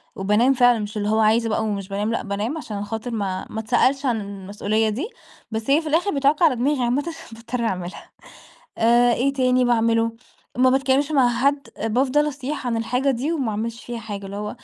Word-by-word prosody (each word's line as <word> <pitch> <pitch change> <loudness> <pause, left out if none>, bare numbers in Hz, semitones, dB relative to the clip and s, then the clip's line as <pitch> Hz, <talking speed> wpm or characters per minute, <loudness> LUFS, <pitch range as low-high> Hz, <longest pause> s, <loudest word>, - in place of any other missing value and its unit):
وبانام 210 +7 +3
فعلًا 245 -2 +4
مش 210 0 -5
اللي 205 0 -1
هو 220 +1 +2
عايزة 225 +1 +3
بقى 220 +1 0
ومش 200 -3 -3
بانام، 205 +3 -2
لأ 230 - -2
بانام 210 +9 -3
عشان 205 -8 -5
خاطر 225 +3 -5
ما 195 -4 -3
ما 220 - -5
اتسألش 255 +5 +1
عن 230 -4 +1
المسؤولية 200 +2 -2
دي، 265 - -3 0.4
بس 220 +3 -4
هي 290 +4 +4
في 320 - -7
الآخر 345 +6 +2
بتعُكّ 280 +3 +2
على 310 -7 +5
دماغي 260 +1 0
عامةً 250 +4 +1 0.3
باضطر 230 +1 -5
أعملها، 185 -4 -5 0.7
آآ، 240 +1 +4
إيه 275 +4 +1
تاني 255 -2 +2
باعملُه؟ 230 -1 +2 0.4
ما 255 0 +5
باتكلّمش 270 +2 +2
مع 265 -4 +4
حد، 275 +4 0 0.2
بافضل 260 +6 +2
أصيح 285 -1 -5
عن 235 - 0
الحاجة 250 +4 0
دي، 270 +6 -1
وما 270 -9 -1
أعملش 230 +3 -4
فيها 240 -1 -5
حاجة، 200 -3 -6
اللي 195 +1 -7
هو 210 0 -4
235 Hz, 195 wpm, -22 LUFS, 215-265 Hz, 0.7 s, على